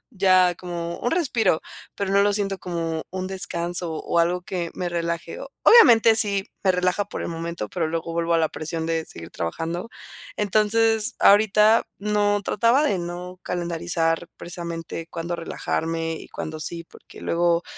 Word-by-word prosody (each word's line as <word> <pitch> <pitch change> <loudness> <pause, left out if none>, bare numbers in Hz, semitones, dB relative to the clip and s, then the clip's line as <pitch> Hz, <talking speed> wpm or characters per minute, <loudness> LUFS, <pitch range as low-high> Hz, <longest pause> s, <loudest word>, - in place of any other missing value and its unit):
Ya 185 -3 +4
como 170 -1 -5
un 245 - 0
respiro, 235 - +1 0.4
pero 195 -1 -2
no 200 0 +5
lo 205 - +3
siento 195 -1 -1
como 165 -2 -3
un 185 0 -4
descanso 175 -2 -3
o 170 +2 0
algo 180 +2 +1
que 175 -2 -4
me 180 - -3
relaje. 170 -1 -3 0.3
Obviamente, 230 - +8
sí, 205 -2 +3
me 190 - +3
relaja 180 +2 +1
por - - -6
el - - -3
momento, 165 -8 -5
pero 165 -3 -2
luego 165 +1 -3
vuelvo 170 0 0
a - - +4
la 160 -1 +2
presión 160 +1 -4
de 165 -1 -1
seguir 85 0 -8
trabajando. 165 - -4 0.5
Entonces, 215 +2 +2
ahorita 210 +2 +5 0.2
no, 205 0 +1
trataba 235 +9 +3
de 200 -11 +1
no 175 +1 -6
calendarizar 170 -1 -1
precisamente 170 -1 -6
cuándo 170 +1 -4
relajarme 165 0 -3
y 160 - -8
cuándo 155 0 -6
sí, 170 +1 -2
porque - - -16
luego 170 0 +1
175 Hz, 160 wpm, -23 LUFS, 165-200 Hz, 0.5 s, Obviamente